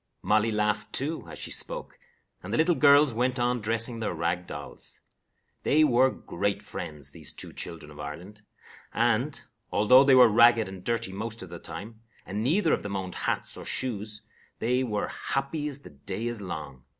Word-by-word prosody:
Molly 110 Hz, +2 st, +3 dB
laughed, 105 Hz, 0 st, 0 dB
too, 155 Hz, +5 st, -2 dB
as -, -, -8 dB
she -, -, -5 dB
spoke, -, -, -3 dB, 0.4 s
and -, -, -7 dB
the -, -, +1 dB
little 165 Hz, +3 st, +4 dB
girls 145 Hz, -3 st, +6 dB
went 125 Hz, +3 st, 0 dB
on 120 Hz, 0 st, +1 dB
dressing 115 Hz, +2 st, +1 dB
their 105 Hz, -5 st, -2 dB
rag 85 Hz, +2 st, -1 dB
dolls. 75 Hz, -1 st, -8 dB, 0.6 s
They 155 Hz, +2 st, +4 dB
were 130 Hz, -2 st, +5 dB
great 100 Hz, -4 st, -3 dB
friends, 75 Hz, -5 st, -5 dB
these -, -, -9 dB
two -, -, -7 dB
children 80 Hz, -3 st, -6 dB
of 75 Hz, -, -13 dB
Ireland, 90 Hz, +9 st, -8 dB, 0.5 s
and, 120 Hz, +5 st, +1 dB, 0.3 s
although 110 Hz, +6 st, +6 dB
they 135 Hz, -1 st, +6 dB
were 125 Hz, -1 st, +9 dB
ragged 115 Hz, 0 st, +5 dB
and 95 Hz, -1 st, -9 dB
dirty 115 Hz, -5 st, -1 dB
most 110 Hz, +2 st, -5 dB
of 95 Hz, -, -10 dB
the 85 Hz, -, -7 dB
time, 105 Hz, +7 st, -8 dB, 0.2 s
and 100 Hz, +3 st, -3 dB
neither 160 Hz, -, +3 dB
of -, -, 0 dB
them 100 Hz, -1 st, -4 dB
owned 95 Hz, -2 st, -4 dB
hats -, -, -1 dB
or -, -, -7 dB
shoes, 110 Hz, -3 st, -2 dB, 0.3 s
they 125 Hz, +3 st, +1 dB
were 105 Hz, -5 st, -2 dB
happy 140 Hz, +2 st, -2 dB
as 140 Hz, -1 st, -5 dB
the -, -, -13 dB
day 95 Hz, +10 st, -5 dB
is 120 Hz, -2 st, -3 dB
long. 75 Hz, -8 st, -7 dB
110 Hz, 185 wpm, -28 LUFS, 95-130 Hz, 0.6 s, were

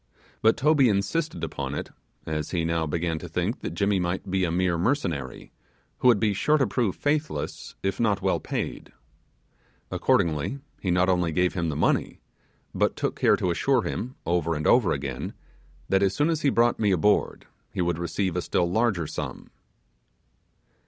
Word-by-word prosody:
But 110 Hz, +1 st, +4 dB
Toby 140 Hz, -3 st, +4 dB
insisted 110 Hz, +12 st, -1 dB
upon -, -, -3 dB
it, -, -, -5 dB, 0.3 s
as 75 Hz, -1 st, -3 dB
he 85 Hz, -3 st, -1 dB
now 80 Hz, -1 st, 0 dB
began 80 Hz, +1 st, -1 dB
to 90 Hz, -, -8 dB
think 90 Hz, +8 st, -1 dB
that 85 Hz, -, -5 dB
Jimmy 100 Hz, +1 st, +1 dB
might 90 Hz, +1 st, -2 dB
be 95 Hz, 0 st, +1 dB
a -, -, -1 dB
mere 90 Hz, 0 st, +1 dB
mercenary, 85 Hz, -, -2 dB, 0.5 s
who -, -, +3 dB
would 120 Hz, -5 st, +6 dB
be 105 Hz, -1 st, +2 dB
sure 150 Hz, +10 st, +2 dB
to 135 Hz, -, +3 dB
prove 115 Hz, -8 st, 0 dB
faithless 150 Hz, +1 st, -2 dB
if 95 Hz, 0 st, -1 dB
not 105 Hz, -4 st, +2 dB
well -, -, +1 dB
paid. -, -, -5 dB, 1.0 s
Accordingly 80 Hz, -, +1 dB, 0.2 s
he 95 Hz, -, -2 dB
not 90 Hz, +1 st, +3 dB
only 90 Hz, -3 st, +2 dB
gave 90 Hz, +3 st, +1 dB
him 85 Hz, -4 st, -1 dB
the 75 Hz, -, -3 dB
money, -, -, 0 dB, 0.5 s
but -, -, +1 dB
took -, -, -2 dB
care -, -, +4 dB
to 90 Hz, -, -1 dB
assure 125 Hz, +7 st, +2 dB
him, 125 Hz, +3 st, -4 dB
over 85 Hz, -1 st, 0 dB
and 75 Hz, +1 st, -3 dB
over 120 Hz, -6 st, +4 dB
again, 70 Hz, -3 st, -3 dB, 0.5 s
that 95 Hz, 0 st, +2 dB
as 95 Hz, -1 st, +2 dB
soon 150 Hz, +3 st, +2 dB
as 160 Hz, -2 st, -1 dB
he 145 Hz, -, +3 dB
brought 120 Hz, -2 st, +2 dB
me 105 Hz, -3 st, +2 dB
aboard 100 Hz, +3 st, +1 dB, 0.3 s
he -, -, -2 dB
would 85 Hz, -1 st, -1 dB
receive 85 Hz, +2 st, -1 dB
a 90 Hz, -, 0 dB
still 85 Hz, 0 st, 0 dB
larger 100 Hz, -2 st, +1 dB
sum. -, -, -6 dB
95 Hz, 180 wpm, -26 LUFS, 85-115 Hz, 1.0 s, would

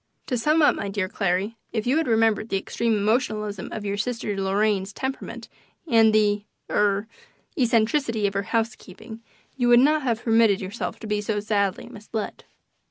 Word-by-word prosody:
To 255 Hz, -, -2 dB
sum 305 Hz, +7 st, +2 dB
up, 295 Hz, -, +6 dB
my 200 Hz, -, -4 dB
dear 195 Hz, -1 st, -1 dB
Clarry, 195 Hz, +4 st, -1 dB
if 220 Hz, -2 st, -2 dB
you 260 Hz, +5 st, +2 dB
had 320 Hz, -, 0 dB
remembered 225 Hz, -1 st, +2 dB
the 195 Hz, -, +1 dB
extreme 225 Hz, +3 st, -1 dB
emotionalism 210 Hz, -2 st, -1 dB
of 215 Hz, -2 st, -5 dB
your 200 Hz, 0 st, -2 dB
sister 225 Hz, -2 st, -2 dB
Lorraine's 195 Hz, 0 st, 0 dB
temperament 265 Hz, +4 st, -5 dB, 0.4 s
and 225 Hz, -5 st, +5 dB
the 210 Hz, -1 st, +2 dB, 0.3 s
er 205 Hz, 0 st, +1 dB, 0.5 s
eccentricity 230 Hz, -2 st, +1 dB
of 200 Hz, -, 0 dB
her 200 Hz, -, 0 dB
housekeeping, 225 Hz, 0 st, -4 dB, 0.4 s
you 245 Hz, -2 st, +1 dB
would 240 Hz, 0 st, +7 dB
not 300 Hz, +4 st, +4 dB
have 240 Hz, -4 st, -1 dB
permitted 225 Hz, -3 st, +4 dB
yourself 195 Hz, +4 st, -5 dB
to -, -, -7 dB
be 210 Hz, -1 st, -1 dB
so 210 Hz, 0 st, -1 dB
sadly 200 Hz, -2 st, -1 dB
misled. 215 Hz, +1 st, -6 dB
220 Hz, 165 wpm, -24 LUFS, 205-235 Hz, 0.5 s, would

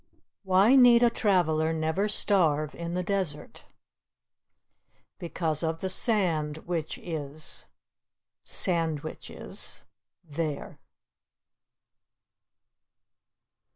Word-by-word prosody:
Why 195 Hz, +6 st, +4 dB
need 245 Hz, -2 st, +7 dB
a 240 Hz, -, +5 dB
traveler 165 Hz, -8 st, +1 dB
never 160 Hz, +6 st, 0 dB
starve 160 Hz, -8 st, +1 dB
in 170 Hz, 0 st, -5 dB
the 180 Hz, -, -1 dB
desert? 180 Hz, -6 st, -3 dB, 1.5 s
Because 165 Hz, -3 st, -2 dB
of 165 Hz, 0 st, -2 dB
the 190 Hz, -, -1 dB
sand 170 Hz, -9 st, +1 dB
which 165 Hz, -3 st, -3 dB
is 155 Hz, -2 st, -7 dB, 0.8 s
(sandwiches) 160 Hz, -4 st, -2 dB, 0.4 s
there. 155 Hz, -2 st, -5 dB
170 Hz, 75 wpm, -27 LUFS, 155-190 Hz, 1.5 s, need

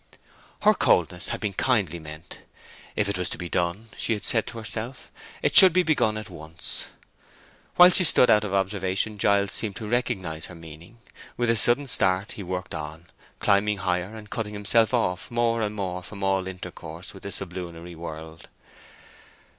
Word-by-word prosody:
Her -, -, +6 dB
coldness 90 Hz, 0 st, +1 dB
had -, -, -3 dB
been 105 Hz, -2 st, -2 dB
kindly 95 Hz, -, 0 dB
meant. 75 Hz, +2 st, -11 dB, 0.6 s
If 105 Hz, -, 0 dB
it 100 Hz, -2 st, -2 dB
was 90 Hz, -, -1 dB
to -, -, -6 dB
be 90 Hz, -1 st, -6 dB
done, 90 Hz, +6 st, -2 dB
she 115 Hz, -, +1 dB
had 105 Hz, -, -4 dB
said 115 Hz, -3 st, +4 dB
to -, -, -8 dB
herself, 115 Hz, +3 st, -4 dB, 0.3 s
it -, -, 0 dB
should 185 Hz, -3 st, +9 dB
be 180 Hz, +1 st, +3 dB
begun 145 Hz, -10 st, +1 dB
at 110 Hz, -, -7 dB
once. 80 Hz, -3 st, -3 dB, 0.9 s
While 180 Hz, +1 st, +8 dB
she 185 Hz, -, +7 dB
stood 135 Hz, -6 st, +7 dB
out 105 Hz, -, +4 dB
of 105 Hz, -, -4 dB
observation 95 Hz, +1 st, -1 dB
Giles 100 Hz, 0 st, +2 dB
seemed 105 Hz, -4 st, -1 dB
to 110 Hz, -, -7 dB
recognize 95 Hz, -9 st, -2 dB
her 90 Hz, -, -12 dB
meaning; 80 Hz, +6 st, -13 dB, 0.4 s
with 120 Hz, -1 st, +1 dB
a -, -, +1 dB
sudden 120 Hz, +5 st, +5 dB
start 95 Hz, -4 st, 0 dB
he -, -, -8 dB
worked 90 Hz, 0 st, -5 dB
on, 80 Hz, +2 st, -7 dB, 0.3 s
climbing 105 Hz, 0 st, +2 dB
higher, 90 Hz, +2 st, -2 dB
and 110 Hz, -1 st, -11 dB
cutting 105 Hz, -1 st, -5 dB
himself 110 Hz, +2 st, +2 dB
off 95 Hz, -7 st, -1 dB
more 120 Hz, -1 st, 0 dB
and 105 Hz, -1 st, -3 dB
more 90 Hz, -3 st, -4 dB
from 100 Hz, +2 st, -9 dB
all 95 Hz, -1 st, 0 dB
intercourse 90 Hz, -2 st, -9 dB
with 95 Hz, -, -13 dB
the 100 Hz, -, -7 dB
sublunary 90 Hz, -2 st, -7 dB
world. 80 Hz, 0 st, -9 dB
100 Hz, 180 wpm, -25 LUFS, 90-110 Hz, 0.9 s, should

